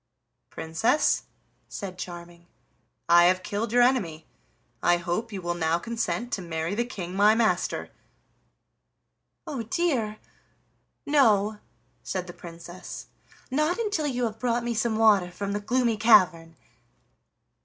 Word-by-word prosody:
"Princess," 165 - +1 0.4
said 185 -3 -7
Charming, 175 -1 -9 0.6
"I 175 0 +7
have 185 +1 +3
killed 210 +2 -3
your 245 +1 +5
enemy; 175 -12 0 0.6
I 175 - +4
hope 180 +7 -3
you 195 -3 -6
will 175 0 -1
now 165 -1 +1
consent 235 +4 -3
to 195 - -1
marry 165 0 -3
the 235 +3 0
King 185 -7 -6
my 210 +2 +5
master." 225 -1 0 1.5
"Oh 275 -6 -4
dear! 230 -5 -1 0.9
no," 215 -8 +3 0.4
said 185 -2 -4
the 175 - -9
Princess, 170 +1 -10 0.4
"not 305 +6 +1
until 410 -10 -1
you 250 -3 -2
have 220 -1 -3
brought 240 0 0
me 240 0 -1
some 225 0 0
water 210 -5 +4
from 200 +3 -5
the 205 - -1
Gloomy 235 +1 +1
Cavern. 185 -7 +4
210 Hz, 130 wpm, -26 LUFS, 175-235 Hz, 1.5 s, I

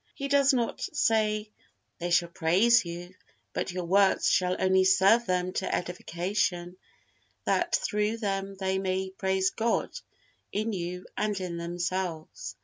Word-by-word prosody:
He 275 0 -4
does 280 0 +5
not 240 -3 -1
say, 215 -1 0 0.5
"they 175 0 -3
shall 170 0 +3
praise 190 +8 +3
you," 175 +2 -7 0.4
but - - -2
"your 180 0 -4
works 195 +2 +3
shall 180 0 +2
only 190 0 +4
serve 195 +5 +4
them 180 0 0
to 190 - -1
edification, 180 0 -2 0.7
that - - +1
through 210 +2 0
them 195 -2 -3
they 190 0 -1
may 190 0 -2
praise 190 0 0
God 230 +1 0 0.6
in 215 +2 -1
you 180 0 -4
and 210 -2 -1
in 180 -2 -4
themselves." 175 -1 -4
190 Hz, 140 wpm, -28 LUFS, 180-210 Hz, 0.7 s, does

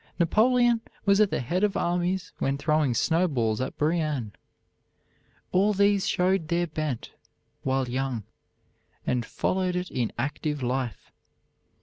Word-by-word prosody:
Napoleon 235 +6 +3 0.2
was 200 +1 +5
at 210 - +4
the - - -1
head 175 - -1
of 205 -1 +2
armies 175 +1 -1
when 135 +1 0
throwing 150 -3 +1
snowballs 130 -8 +1
at 130 - -4
Brienne. 150 -7 0 1.2
All 200 +3 +3
these 200 0 +3
showed 180 -2 +1
their 170 +1 +1
bent 155 -6 -4 0.5
while 135 -1 0
young, 130 -2 -2 0.8
and 125 -1 0
followed 185 +9 -1
it 180 0 -3
in 120 -3 -1
active 145 0 -2
life. 125 -4 -3
160 Hz, 125 wpm, -27 LUFS, 130-185 Hz, 1.2 s, was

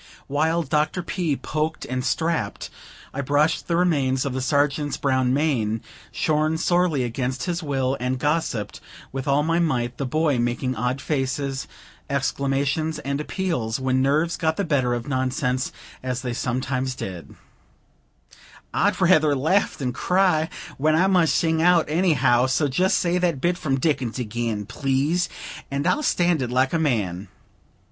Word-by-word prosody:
While 160 +4 +1
Dr. 155 +5 0
P. 170 -4 -1
poked 155 +3 -3
and 130 0 -3
strapped, 160 -12 -1 0.4
I 140 - -2
brushed 145 +4 +1
the 170 - +1
remains 140 -7 +1
of 135 - -2
the 130 - -2
Sergeant's 145 +2 +1
brown 130 -3 +1
mane 125 -7 +1 0.3
shorn 155 +1 +1
sorely 175 -5 +2
against 125 +1 -2
his 175 -1 -2
will 135 -3 -1
and 125 +1 -1
gossiped 145 -6 -1 0.3
with 135 +1 -5
all 140 +1 +3
my 165 +2 +1
might, 125 -7 0
the 135 - -1
boy 150 -1 +1
making 120 +2 -1
odd 125 +3 -1
faces, 135 -1 -2 0.4
exclamations, 140 +3 0
and 140 +2 -3
appeals, 150 - -2
when 130 0 +1
nerves 155 +5 +1
got 160 0 0
the 200 - 0
better 130 -8 +1
of 120 -1 -5
nonsense, 130 -1 -1 0.3
as 130 0 -3
they 125 -2 -2
sometimes 130 +1 -2
did: 90 - -7 1.4
"I'd 205 +2 +1
rather 155 -5 +4
laugh 160 +9 +1
than 125 -3 -2
cry, 180 -1 +2 0.3
when 155 +2 +3
I 175 +4 +4
must 180 -4 +3
sing 160 -1 +2
out 175 -1 +5
anyhow, 150 -7 +3
so 140 +3 +1
just 180 +8 +2
say 175 0 +1
that 170 -6 0
bit 175 +6 +1
from 135 -6 -1
Dickens 130 -5 0
again, 115 -3 -3
please, 140 - 0 0.4
and 140 +1 -2
I'll 300 - +2
stand 175 - +2
it 125 - -2
like 130 +3 +1
a 165 - +2
man." 105 - -1
140 Hz, 155 wpm, -23 LUFS, 130-160 Hz, 1.4 s, out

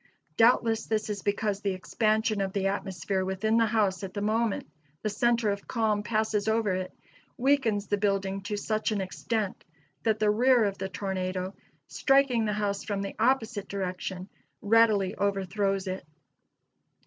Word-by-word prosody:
Doubtless 225 -1 +3
this 215 -1 -1
is 200 -1 -4
because 205 0 -1
the 195 -2 -1
expansion 215 +2 0
of 195 -1 -2
the 195 -1 -1
atmosphere 195 -1 -1
within 190 +4 0
the 230 -1 +4
house 205 -5 +1
at 190 0 -6
the 205 - -2
moment 220 +1 0 0.4
the 215 - 0
center 235 0 +2
of 200 0 -5
calm 220 -3 +1
passes 215 -1 0
over 220 -3 +2
it 185 0 -3 0.5
weakens 245 -6 +2
the 205 0 -1
building 195 -1 0
to 205 +1 -3
such 215 +1 -1
an 210 - 0
extent 200 +2 -3 0.4
that 220 -2 +1
the 215 -1 +3
rear 245 +2 +4
of 200 -1 -1
the 190 0 -3
tornado, 185 -1 -3 0.3
striking 270 -4 +2
the 210 - 0
house 205 -1 -1
from 200 -2 -2
the 195 - -5
opposite 225 -4 +1
direction, 185 -1 -4 0.4
readily 210 -3 +4
overthrows 195 0 -1
it. 190 0 -4
205 Hz, 160 wpm, -28 LUFS, 195-220 Hz, 0.5 s, the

